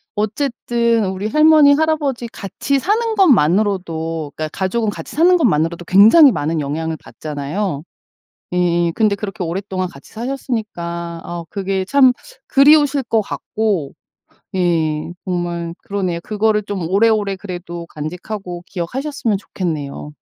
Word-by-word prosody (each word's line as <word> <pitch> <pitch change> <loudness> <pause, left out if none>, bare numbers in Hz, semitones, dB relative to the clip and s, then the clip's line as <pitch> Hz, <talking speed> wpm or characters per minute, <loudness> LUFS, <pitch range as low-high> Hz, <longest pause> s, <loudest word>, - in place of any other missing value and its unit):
어쨌든 235 0 0
우리 190 +2 -3
할머니, 305 +2 +6
할아버지 295 -5 0
같이 230 +6 -2
사는 440 - 0
것만으로도 170 - +2
그러니까 155 0 -3
가족은 210 +3 0
같이 - - -9
사는 350 +4 +5
것만으로도 170 - +1
굉장히 225 - +7
많은 160 -4 -1
영향을 160 +3 -3
받잖아요. 150 +3 -4 0.7
예예. 175 -1 +2
근데 215 -3 +3
그렇게 200 -2 -5
오랫동안 185 +2 -3
같이 140 -5 -15
사셨으니까 210 -9 -4
어 170 -1 -6
그게 195 -1 -2
참 260 +2 +5 0.4
그리우실 290 -1 +5
것 225 -1 +1
같고 205 -6 -2 0.6
예 165 -3 0
정말 175 -2 -3
그러네요. 185 -4 -2
그거를 215 0 +1
좀 195 -5 -4
오래오래 205 0 +2
그래도 175 -3 -7
간직하고 175 +4 -6
기억하셨으면 230 - -2
좋겠네요. 150 -7 -5
195 Hz, 325 characters per minute, -18 LUFS, 170-235 Hz, 0.7 s, 굉장히